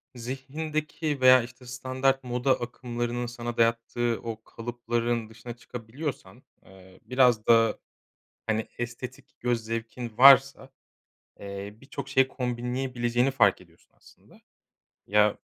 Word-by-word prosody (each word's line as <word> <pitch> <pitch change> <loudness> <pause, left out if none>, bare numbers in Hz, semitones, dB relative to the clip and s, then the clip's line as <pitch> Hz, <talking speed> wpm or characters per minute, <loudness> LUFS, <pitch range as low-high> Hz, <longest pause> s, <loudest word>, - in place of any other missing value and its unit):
zihnindeki 150 +4 -4
veya, 130 -1 +7
işte, 125 +1 -12
standart 130 +1 -1
moda 125 +1 +1
akımlarının 120 0 -3
sana 120 0 -6
dayattığı 115 0 +1
o 115 -1 -6
kalıpların 120 -1 -3
dışına 115 +2 -9
çıkabiliyorsan, 120 +5 -7 0.2
eee, 95 -1 -17
biraz 125 -4 +3
da, 115 -1 +4 0.7
hani, 110 0 0
estetik 125 +3 -7
göz 120 -2 0
zevkin 115 0 -5
varsa, 135 0 +7 0.7
eee, 100 0 -7
birçok 140 0 -7
şeyi 135 -1 +4
kombinleyebileceğini 125 0 -1
fark 105 -8 +3
ediyorsun 85 -2 -23
aslında. - - -21 0.7
Ya, 105 0 +3
120 Hz, 110 wpm, -27 LUFS, 115-130 Hz, 0.7 s, veya